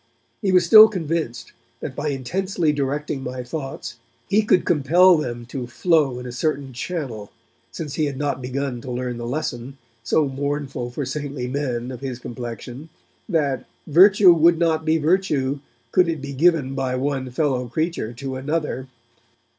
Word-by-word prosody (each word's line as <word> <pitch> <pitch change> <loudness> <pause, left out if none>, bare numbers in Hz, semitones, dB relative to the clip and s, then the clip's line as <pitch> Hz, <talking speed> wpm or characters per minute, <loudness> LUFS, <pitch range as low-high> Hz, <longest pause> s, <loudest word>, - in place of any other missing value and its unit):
He 195 - +1
was 180 -1 +4
still 215 +4 +10
convinced 165 - -3 0.3
that - - -6
by 145 - -3
intensely 160 +4 -1
directing 145 0 -2
my 125 -1 -5
thoughts, 135 -3 -6 0.3
he 210 - +3
could 210 -4 +2
compel 175 +3 +5
them 120 -6 -3
to 125 -1 -5
flow 145 0 +2
in 125 - -7
a 125 - -5
certain 140 0 -2
channel, 125 - -5 0.4
since 150 -4 -6
he 155 - 0
had 140 -2 -4
not 140 -2 -2
begun 130 -1 -3
to 130 - -8
learn 125 0 -3
the 120 - -5
lesson, 135 -1 -4 0.2
so 145 +5 +1
mournful 140 -2 -3
for 135 +3 -4
saintly 140 -1 -4
men 125 -2 -3
of 125 - -7
his 130 -3 -4
complexion, 120 +4 -7 0.4
that 145 -7 0 0.2
'virtue 185 +3 +7
would 170 +1 +4
not 160 -1 +1
be 160 +1 +3
virtue, 150 -5 +1 0.3
could 180 -2 +4
it 160 -2 -2
be 140 +1 -6
given 150 -2 +2
by 130 -2 -1
one 135 0 -2
fellow 130 -2 0
creature 155 -3 -2
to 130 +2 -6
another'. 150 -1 -2
140 Hz, 160 wpm, -22 LUFS, 125-160 Hz, 0.4 s, still